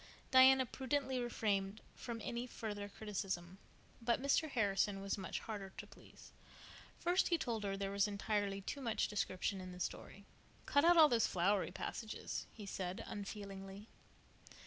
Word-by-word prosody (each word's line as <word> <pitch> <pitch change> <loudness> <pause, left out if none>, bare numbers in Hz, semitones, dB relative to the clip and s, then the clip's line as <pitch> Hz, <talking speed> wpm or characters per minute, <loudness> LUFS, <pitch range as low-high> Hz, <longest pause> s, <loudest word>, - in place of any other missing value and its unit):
Diana 260 0 +8
prudently 265 +1 -1
refrained 210 -4 0 0.2
from 235 -2 -5
any 240 +1 -3
further 205 -4 -5
criticism, 195 -4 -4 0.4
but 235 0 +2
Mr. 280 +4 +2
Harrison 205 -4 +1
was 195 0 -1
much 190 -2 -4
harder 205 -4 -5
to - - -6
please. - - -15 0.7
First 355 +2 +2
he 340 - +3
told 235 -8 -2
her 195 -1 -1
there 195 0 -2
was 200 +1 +2
entirely 200 -1 -1
too 280 +8 -5
much 225 -4 0
description 195 -1 -1
in 185 0 -7
the 180 - -10
story. 200 +2 -5 0.4
"Cut 285 - +4
out 345 +1 +7
all 315 -2 +10
those 235 -5 +3
flowery 190 +2 +2
passages," 215 +4 -5
he 210 - -9
said 185 -1 -4
unfeelingly. 200 0 -7
210 Hz, 150 wpm, -38 LUFS, 195-240 Hz, 0.7 s, all